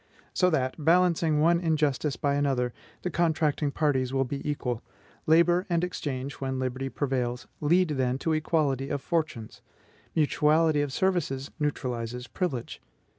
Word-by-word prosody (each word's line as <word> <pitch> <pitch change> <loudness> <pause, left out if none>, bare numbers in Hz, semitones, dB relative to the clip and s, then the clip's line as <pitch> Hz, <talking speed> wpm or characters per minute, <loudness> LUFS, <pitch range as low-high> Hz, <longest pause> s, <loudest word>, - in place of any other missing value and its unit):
So 180 - +3
that, 135 -1 -1
balancing 165 -2 +3
one 170 +2 +4
injustice 150 -4 0
by 140 -1 0
another, 135 -4 0 0.3
the 180 - -2
contracting 160 -3 +1
parties 135 -4 0
will 135 0 +1
be 140 +2 -4
equal. 125 -5 -2 0.5
Labor 175 +4 +4
and 170 -1 +1
exchange, 140 -6 -4
when 130 -1 -2
liberty 130 +1 -2
prevails, 125 -3 -2
lead, 175 +4 +3
then, 130 -3 0
to 160 +3 -1
equality 150 -4 0
of 145 - -1
fortunes; 150 -7 -3 0.5
mutuality 155 0 +3
of 145 -2 -2
services 155 -6 -1
neutralizes 125 -4 -3
privilege. 130 -4 -4
145 Hz, 135 wpm, -27 LUFS, 130-160 Hz, 0.5 s, one